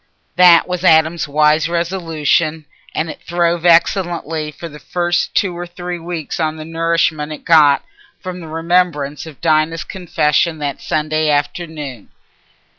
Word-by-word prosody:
That 175 -2 +6
was 180 -1 -3
Adam's 160 -1 +3
wise 150 +2 +2
resolution, 165 -2 -1 0.3
and 160 - -1
it 155 - -8
throve 175 0 0
excellently 165 -3 +1
for 170 +3 -9
the 150 -2 -12
first 175 +3 -1
two 185 -3 +1
or 175 +1 -6
three 175 0 -6
weeks 165 -2 -5
on 155 -1 0
the 155 - -8
nourishment 165 -2 0
it 150 - -9
got 150 -4 +5 0.4
from 185 -1 -7
the 165 - -9
remembrance 165 -3 -1
of 155 -4 -13
Dinah's 160 0 +1
confession 170 -3 0
that 145 -2 -4
Sunday 155 0 -1
afternoon. 145 - -3
165 Hz, 140 wpm, -17 LUFS, 155-175 Hz, 0.4 s, That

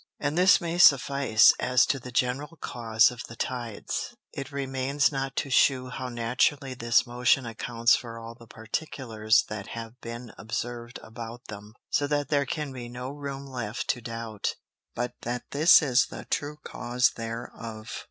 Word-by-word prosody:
And 145 +1 -1
this 185 +3 +6
may 170 0 -3
suffice, 140 -7 +6
as 125 0 +4
to 135 - 0
the 125 0 -9
general 135 +7 -1
Cause 115 -1 +2
of 125 0 -8
the 115 - -10
Tides; 120 -3 -4 0.2
it 140 - -6
remains 135 +1 0
now 135 -1 -2
to 135 - -2
shew 130 -1 +3
how 130 0 -5
naturally 130 +4 0
this 120 -1 +3
Motion 125 +1 +2
accounts 115 +1 +2
for 115 -2 -6
all 115 0 -8
the 115 -1 -16
Particulars 110 -2 0
that 105 -2 -6
have 115 +3 -8
been 120 0 -7
observ'd 120 +2 -4
about 115 +1 -9
them; 105 +1 -9 0.2
so 145 - +2
that 145 0 -1
there 140 -2 +2
can 150 0 -3
be 120 -2 -7
no 125 +2 -6
room 140 -1 -6
left 120 -4 -4
to 120 - +1
doubt, 115 -2 -4 0.4
but 120 0 -2
that 120 +1 -3
this 155 +4 +7
is 130 -3 +3
the - - -9
true 145 +1 -1
cause 125 +1 +1
thereof. 115 -1 -7
125 Hz, 165 wpm, -27 LUFS, 115-140 Hz, 0.4 s, this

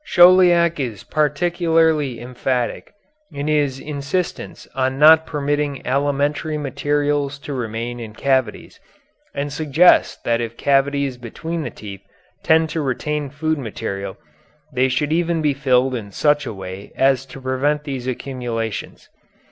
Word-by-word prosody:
Chauliac 175 - +5
is 115 -7 -4
particularly 160 -3 +1
emphatic 125 +5 -3 0.4
in 140 0 -5
his 145 -3 +1
insistence 150 +5 -4
on 130 0 -1
not 160 +2 +7
permitting 145 -1 -2
alimentary 145 +3 0
materials 145 0 -1
to 140 +1 -7
remain 120 -1 -4
in 110 -2 -8
cavities, 130 -5 -1 0.6
and 140 0 -3
suggests 155 +3 +4
that 115 0 +1
if 115 0 -5
cavities 140 -1 +1
between 160 +8 -5
the - - -4
teeth 100 -2 -10 0.4
tend 160 0 +3
to 160 - -2
retain 145 +2 -2
food 155 +2 -2
material 100 -5 -5 0.6
they 130 +1 +2
should 145 +4 0
even 170 0 +1
be 150 -2 +1
filed 130 -2 +2
in 110 -5 -5
such 145 +5 +1
a - - -4
way 95 0 -8
as 135 -1 +3
to 135 - -10
prevent 135 +3 0
these 135 -4 -5
accumulations. 120 -4 -4
140 Hz, 130 wpm, -20 LUFS, 125-150 Hz, 0.6 s, not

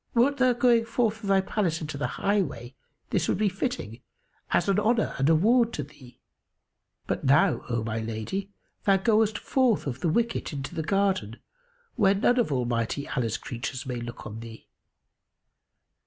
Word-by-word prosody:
Wert 270 +4 +3
thou 255 -2 +4
going 240 -1 +3
forth 225 -1 -1
of 200 - -5
thy 195 -1 +4
palace 190 -4 -1
into 155 -2 -5
the 145 - -2
highway, 180 - -1 0.4
this - - +1
would - - +1
be 210 0 +2
fitting, 185 - -4 0.5
as - - +1
an 195 0 +3
honour 225 +1 +1
and 135 +3 +3
a 165 - +6
ward 230 +7 +3
to 145 - -3
thee; 135 -3 -16 0.9
but, - - -3
now, 155 +6 +3
O 120 -2 -1
my 110 0 -2
lady, 115 - -4 0.3
thou 195 -1 +5
goest 215 +1 +2
forth 255 -5 +1
of 130 -3 -4
the 170 - 0
wicket 230 0 -1
into 140 -1 -5
the 160 - -2
garden, 190 - 0 0.6
where 200 -3 +4
none 245 +5 +3
of 230 - +1
Almighty 120 +1 -1
Allah's 115 -5 -1
creatures 125 +2 -5
may 125 -2 -4
look 120 0 -8
on 110 +1 -7
thee." 115 -1 -11
185 Hz, 170 wpm, -27 LUFS, -, 0.9 s, a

